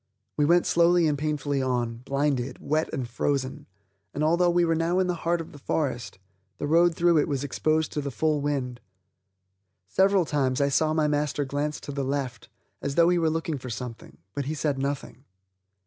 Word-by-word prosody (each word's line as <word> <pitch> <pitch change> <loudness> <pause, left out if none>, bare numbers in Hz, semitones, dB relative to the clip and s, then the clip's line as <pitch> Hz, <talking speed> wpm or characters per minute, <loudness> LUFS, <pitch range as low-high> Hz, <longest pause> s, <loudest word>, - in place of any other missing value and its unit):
We 150 - +2
went 175 +3 +4
slowly 170 0 +4
and 150 -2 +2
painfully 145 -1 -1
on, 120 -3 -1
blinded, 135 0 -1
wet 155 +1 -1
and 130 -6 -3
frozen, 130 +2 -2 0.5
and, 150 - -1
although 170 +3 +3
we 175 0 +3
were 165 - +2
now 165 +2 +1
in 190 - +3
the 180 - 0
heart 170 0 -1
of 165 - -7
the 145 - -12
forest, 135 -7 -2 0.4
the - - -3
road 170 +3 +4
through 170 -2 +4
it - - +1
was 140 -3 -2
exposed 155 +3 0
to 150 - -2
the 140 - -3
full 150 +2 0
wind. 130 -4 -2 1.1
Several 195 -2 +3
times 135 -4 0
I 140 0 +2
saw 155 +3 +2
my 155 -1 +2
master 145 -1 0
glance 145 +2 -2
to - - -7
the 140 0 -2
left, 130 -4 -3 0.3
as 140 0 -3
though 170 +2 +5
he 180 -1 +3
were 165 -1 +2
looking 160 -2 -2
for 130 - -7
something, 115 0 -7 0.2
but 140 - -3
he 155 +3 -2
said 145 -2 -1
nothing. 140 -1 -4
145 Hz, 195 wpm, -26 LUFS, 135-165 Hz, 1.1 s, though